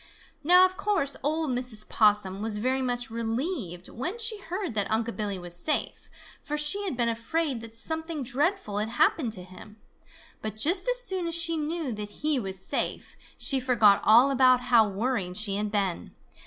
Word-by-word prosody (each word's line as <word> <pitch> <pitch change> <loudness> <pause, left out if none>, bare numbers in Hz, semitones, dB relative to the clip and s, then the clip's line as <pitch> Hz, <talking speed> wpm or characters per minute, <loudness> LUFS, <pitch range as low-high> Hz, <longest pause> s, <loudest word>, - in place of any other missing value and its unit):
Now 360 +4 +7
of 370 0 -3
course 375 -10 0
old 310 +1 -1
Mrs. 245 -4 +1
Possum 205 -3 +2
was 215 -1 -1
very 260 +5 0
much 245 -2 -2
relieved 230 - -4
when 350 - -5
she 450 -2 -1
heard 370 - -5
that 205 -2 -1
Unc' 225 +1 -1
Billy 205 -3 -3
was 175 -1 -8
safe, 300 - -2 0.3
for 300 -1 -4
she 300 +8 +3
had 345 -11 -3
been 240 -1 +1
afraid 245 +3 -2
that 225 0 -10
something 320 +3 -3
dreadful 270 - -1
had 215 +1 -2
happened 245 +1 +1
to 185 -4 -8
him. 190 +4 -14 0.6
But 215 -1 -5
just 350 - +2
as - - +2
soon 375 -6 -1
as 335 - 0
she 335 0 +4
knew 310 -3 -3
that 210 -1 -6
he 295 +6 0
was 195 -4 -5
safe, - - -3 0.2
she 270 - +1
forgot 235 -6 +4
all 240 +6 +6
about 255 -1 +4
how 235 -4 +4
worried 200 -3 -2
she 210 -2 0
had 210 0 -2
been. 195 -4 -2
245 Hz, 180 wpm, -27 LUFS, 215-320 Hz, 0.6 s, Now